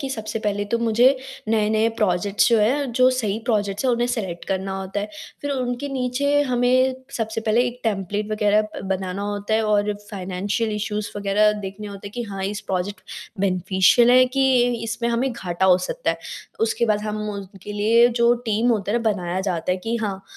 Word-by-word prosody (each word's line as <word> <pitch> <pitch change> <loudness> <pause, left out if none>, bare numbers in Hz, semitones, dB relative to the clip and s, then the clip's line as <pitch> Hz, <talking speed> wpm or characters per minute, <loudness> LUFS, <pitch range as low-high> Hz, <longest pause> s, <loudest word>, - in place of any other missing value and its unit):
कि 275 - -3
सबसे 220 -2 -4
पहले 205 -1 -1
तो 235 - +3
मुझे 235 +4 +4 0.3
नए-नए 220 0 +2
प्रोजेक्ट्स 200 +2 +2
जो 230 -2 +4
हैं, 255 +4 +1
जो 255 +2 +5
सही 220 -5 -1
प्रोजेक्ट्स 210 -1 0
हैं 255 - +3
उन्हें 240 +1 +1
सेलेक्ट 195 -8 -3
करना 190 0 -2
होता 190 +2 -4
है। 205 - -4 0.3
फिर 285 - -2
उनके 255 0 -2
नीचे 270 +3 +1
हमें 255 +1 +3 0.2
सबसे 225 -1 -2
पहले 225 +2 +2
एक 245 0 -6
टेम्पलेट 205 0 -2
वग़ैरह 210 0 +3
अ, 215 0 -6
बनाना 190 0 -3
होता 205 +1 -2
है 220 - +2
और 210 0 +2 0.2
फाइनेंशियल 200 +3 -2
इश्यूज 210 0 -3
वग़ैरह 205 +1 +3
देखने 200 +2 -7
होते 200 0 -8
हैं - - -18
कि 245 - -3
हाँ 195 -1 -4
इस 200 +2 -3
प्रोजेक्ट 190 0 -3 0.4
बेनिफिशियल 190 +5 +4
है 255 +1 +7
कि 270 - +4 0.4
इसमें 230 +1 -2
हमें 240 +3 0
घाटा 185 -5 -2
हो 185 -1 +6
सकता - - -1
है? - - -4 0.4
उसके 225 +1 +1
बाद 210 -1 +1
हम 215 0 -3
उनके 200 0 -8
लिए 225 +3 +4
जो 235 0 +6
टीम 220 +3 +1
होता 210 -2 0
है, 235 - +2
बनाया 190 -5 -1
जाता 180 -2 -1
है - - -1
कि 230 +5 -2
हाँ, 200 -3 -3
215 Hz, 190 wpm, -22 LUFS, 200-235 Hz, 0.4 s, है